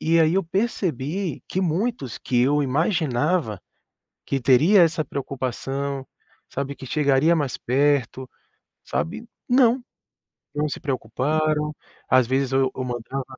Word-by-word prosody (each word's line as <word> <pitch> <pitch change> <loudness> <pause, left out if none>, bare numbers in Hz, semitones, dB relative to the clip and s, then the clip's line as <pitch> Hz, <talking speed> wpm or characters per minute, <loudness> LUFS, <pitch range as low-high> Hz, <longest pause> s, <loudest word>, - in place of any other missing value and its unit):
e 165 +1 +3
aí 160 +1 +4
eu 195 - +2
percebi 180 - -2
que 190 - -2
muitos 180 - -1
que 125 -2 0
eu 145 +3 +3
imaginava 145 - 0 0.7
que 135 - 0
teria 155 - +5
essa 160 -1 +2
preocupação, 135 0 -4 0.4
sabe, 140 +1 -4
que 130 - -9
chegaria 145 +3 +3
mais 145 -4 -1
perto, 130 -1 +1 0.6
sabe? 225 +8 -3 0.2
Não, 250 0 +4 0.7
não 150 +1 0
se - - -5
preocuparam. 150 +3 -1 0.3
Às 130 -1 +4
vezes 135 0 0
eu 135 0 +2
eu 130 - -4
mandava 125 +2 -4
145 Hz, 125 wpm, -23 LUFS, 130-165 Hz, 0.7 s, teria